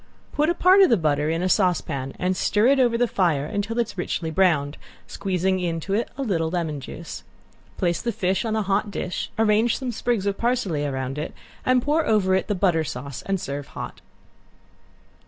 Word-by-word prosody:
Put 300 +2 +1
a 345 - +1
part 370 +3 +6
of 385 - +6
the 230 - +4
butter 150 -2 +1
in 165 +2 -1
a - - +2
saucepan 170 -9 0
and 185 +1 0
stir 210 +3 +2
it 275 0 +4
over 240 -2 +3
the 245 +1 +2
fire 165 -10 +1
until 205 +7 -3
it 235 - +2
is 205 -2 -12
richly 165 -2 -2
browned, 155 -5 +2 0.3
squeezing 185 0 -1
into 170 +1 -2
it 225 +4 0
a 275 - -2
little 165 -9 0
lemon 160 -4 -2
juice. 160 +5 -8 0.6
Place 175 -3 0
the 235 - -1
fish 190 -1 0
on 220 -2 -1
a 220 - +1
hot 200 +2 0
dish, 180 -2 -4
arrange 220 +1 +3
some 255 -2 -3
sprigs 235 -3 -1
of 200 -1 -1
parsley 235 -11 0
around 135 0 -3
it, 155 - -5 0.3
and 255 -1 +4
pour 305 +3 +2
over 205 -4 +3
it 190 - +1
the 205 - 0
butter 175 -4 +2
sauce, 135 -1 -6
and 195 -1 0
serve 140 -2 -5
hot. - - -6
190 Hz, 200 wpm, -24 LUFS, 160-225 Hz, 0.6 s, part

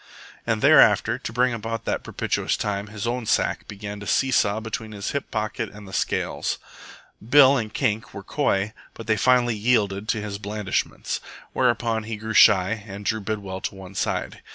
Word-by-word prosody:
And - - 0
thereafter, - - +5
to - - -6
bring 125 +1 +2
about 115 0 -4
that - - -1
propitious - - -1
time, 100 0 -2
his 105 0 -6
own 120 -1 -2
sack - - 0
began 100 0 -7
to 105 - -8
see 135 +9 +2
saw 105 -3 +2
between 110 0 -5
his 100 -1 -4
hip 140 - -3
pocket 110 0 -3
and 105 -1 -12
the 95 - -11
scales. - - -1 0.7
Bill 135 +3 +6
and 110 -5 -2
Kink 105 0 -1
were - - -8
coy, 100 +2 0 0.2
but 115 - -9
they 110 - +2
finally 120 +1 +3
yielded 105 -2 +1
to 110 - 0
his 105 -1 -5
blandishments. 105 -1 -3 0.3
Whereupon 120 -3 +1
he 110 -1 -4
grew 110 +1 -5
shy 100 +2 +5
and 100 0 -8
drew 110 +1 0
Bidwell 100 -2 -4
to - - -4
one 95 0 -10
side. 95 - -2
110 Hz, 180 wpm, -24 LUFS, 100-115 Hz, 0.7 s, Bill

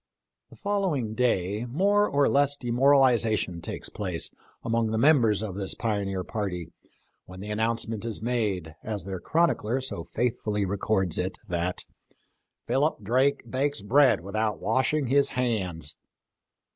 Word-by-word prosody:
The - - -15
following 185 - -1
day 110 -2 0
more 200 - +3
or 140 0 +3
less 145 0 +3
demoralization 120 -8 +3
takes - - -5
place 90 -5 -2 0.3
among 115 0 +1
the 110 - -1
members 115 -6 +4
of 105 -4 -4
this 95 0 -2
pioneer 100 -4 -2
party 90 -5 -4 0.5
when 95 0 -11
the 105 +2 -6
announcement 115 0 -1
is 115 -2 -3
made, 105 -9 -1
as 105 -2 -4
their 95 -1 -5
chronicler 135 - +1
so 130 -10 -4
faithfully 110 -3 -1
records 95 -2 0
it, 95 +1 -2
that 90 +1 -1 0.4
" - - -50
Philip 140 -4 +1
Drake 130 +6 +2
Bakes 140 -3 -1
bread 130 - +4
without 105 +3 -2
washing 140 +3 +1
his 140 +3 +3
hands." 95 - -2
110 Hz, 135 wpm, -27 LUFS, 95-130 Hz, 0.5 s, members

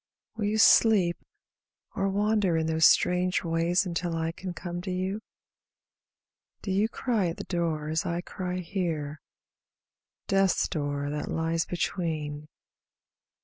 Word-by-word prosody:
Will 220 -2 -2
you 210 +1 0
sleep, 200 -5 +5 0.7
or 195 0 0
wander 205 -3 +1
in 160 - 0
those 160 -1 +5
strange 180 +1 +2
ways 170 +2 +1
Until 170 -1 -2
I 165 0 -1
can 185 +2 -6
come 175 0 -5
to 185 - -6
you? 185 +3 -2 1.4
Do 195 - -3
you 205 +4 +2
cry 225 -8 0
at 165 - -4
the - - -5
door 165 -4 -2
as 160 +1 0
I 170 +1 -2
cry 180 0 -4
here, 165 -5 -3 1.0
Death's 195 -2 +2
door 145 -1 -2
that 150 0 -4
lies 165 0 -1
between? 155 -4 -3
175 Hz, 135 wpm, -28 LUFS, 160-190 Hz, 1.4 s, sleep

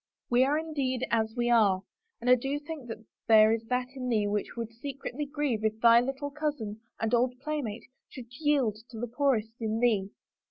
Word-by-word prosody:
We 245 +1 +5
are 285 +3 +2
indeed 275 -6 -2
as 220 -1 +1
we 240 0 +1
are, 200 -5 +4 0.4
and 235 - -6
I 250 - +8
do 270 +3 0
think 295 -4 -8
that 225 -1 -8 0.2
there 220 0 +7
is 225 0 -2
that 250 +1 0
in 255 -1 -4
thee 215 -3 +2
which 205 0 -2
would 230 -1 -4
secretly 275 +3 -5
grieve 285 -7 -1
if 220 0 0
thy 235 0 +7
little 270 +3 -4
cousin 280 -8 -3 0.2
and 225 +1 -1
old 250 +1 +2
playfellow 275 -7 -3 0.3
should 255 - -9
yield 275 -9 +1
to 230 - -10
the 240 - -1
poor 270 +3 +2
est 220 +1 -5
in 220 0 -1
thee." 215 -5 +2
240 Hz, 200 wpm, -29 LUFS, 220-275 Hz, 0.4 s, I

